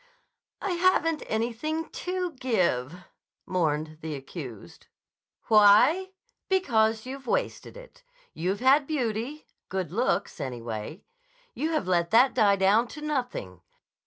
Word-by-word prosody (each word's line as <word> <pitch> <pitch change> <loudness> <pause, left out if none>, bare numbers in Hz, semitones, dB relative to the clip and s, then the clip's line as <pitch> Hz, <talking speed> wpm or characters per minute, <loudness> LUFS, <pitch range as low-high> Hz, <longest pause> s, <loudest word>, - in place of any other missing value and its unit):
"I 395 - -1
haven't 345 -3 +2
anything 245 +9 -2
to 365 -1 -3
give," 180 - -1 0.4
mourned 155 -3 -1
the 155 -2 -4
accused. 130 - -9 0.6
"Why? 225 - +5 0.4
Because 225 - +2
you've 265 0 -8
wasted - - -2
it. - - -14 0.3
You've 185 +6 -2
had 275 +2 +4
beauty; 255 0 -3 0.2
good 185 -4 -3
looks, 215 -1 -1
anyway. 120 - -6 0.5
You 310 - -2
have 305 - -1
let 170 -2 +1
that 245 +7 +5
die 210 -5 +4
down 200 +5 +3
to 300 - -10
nothing. 245 - -4
220 Hz, 115 wpm, -27 LUFS, -, 0.6 s, Why